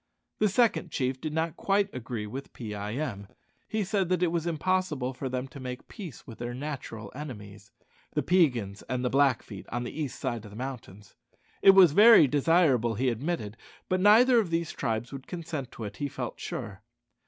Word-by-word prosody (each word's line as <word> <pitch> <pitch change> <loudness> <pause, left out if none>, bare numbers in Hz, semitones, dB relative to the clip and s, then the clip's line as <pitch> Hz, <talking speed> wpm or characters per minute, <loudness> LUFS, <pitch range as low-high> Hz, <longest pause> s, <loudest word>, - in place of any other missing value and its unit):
The 210 - +3
second 210 -4 +2
chief 130 -3 -2
did 155 - -3
not 160 +1 -1
quite 200 +1 +1
agree 115 -3 -5
with 130 +6 -7
Pee 110 -4 -6
eye 105 +2 -4
em. 115 -9 -4 0.4
He 220 -1 -1
said 190 -2 0
that 180 -1 +1
it 170 - +2
was 170 -1 -1
impossible 165 -5 0
for 130 +1 -5
them 130 +1 -3
to 140 - -11
make 125 -1 -7
peace 180 - -9
with 115 - -11
their 120 0 -4
natural 125 -7 -6
enemies, 105 -8 -9 0.4
the - - 0
Peigans 125 - +2
and 125 0 -1
the 125 - 0
Blackfeet 130 -7 +1
on 120 +1 -3
the 120 - -5
east 150 -4 -4
side 120 -5 -3
of 105 - -10
the 105 - -11
mountains. 120 -6 -8 0.5
It 195 - +8
was 185 -5 +8
very 210 0 +8
desirable, 140 -5 +3
he 130 +4 +1
admitted; 120 -3 -3 0.3
but 185 - +1
neither 235 +5 +6
of 205 -6 -1
these 165 -1 -1
tribes 115 -2 -3
would 135 -1 -8
consent 165 -6 -5
to 115 - -7
it, 105 -1 -7
he 145 - -2
felt - - -6
sure. - - -6
135 Hz, 195 wpm, -28 LUFS, 120-170 Hz, 0.5 s, It